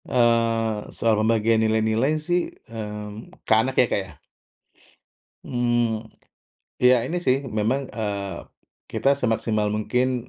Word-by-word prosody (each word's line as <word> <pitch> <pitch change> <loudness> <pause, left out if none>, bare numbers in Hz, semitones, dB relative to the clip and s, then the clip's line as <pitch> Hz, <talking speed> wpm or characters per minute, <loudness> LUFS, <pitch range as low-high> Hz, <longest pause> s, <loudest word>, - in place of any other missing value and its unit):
Eee, 115 -3 +1
soal 115 -1 +2
pembagian 110 0 +2
nilai-nilai 110 +4 +2
sih, 175 +3 0 0.3
mmm, 105 -1 -8
ke - - +3
anak 130 +3 -2
ya, - - +4
Kak, - - +1
ya? 90 - -13 1.3
Mmm, 120 -2 0 0.8
iya 125 0 +7
ini 165 - -3
sih 130 0 +4 0.2
memang, 115 +6 +1 0.2
eee, 100 -3 -3 0.5
kita - - +1
semaksimal 110 -2 0
mungkin 125 +3 -1
115 Hz, 115 wpm, -24 LUFS, 110-125 Hz, 1.3 s, iya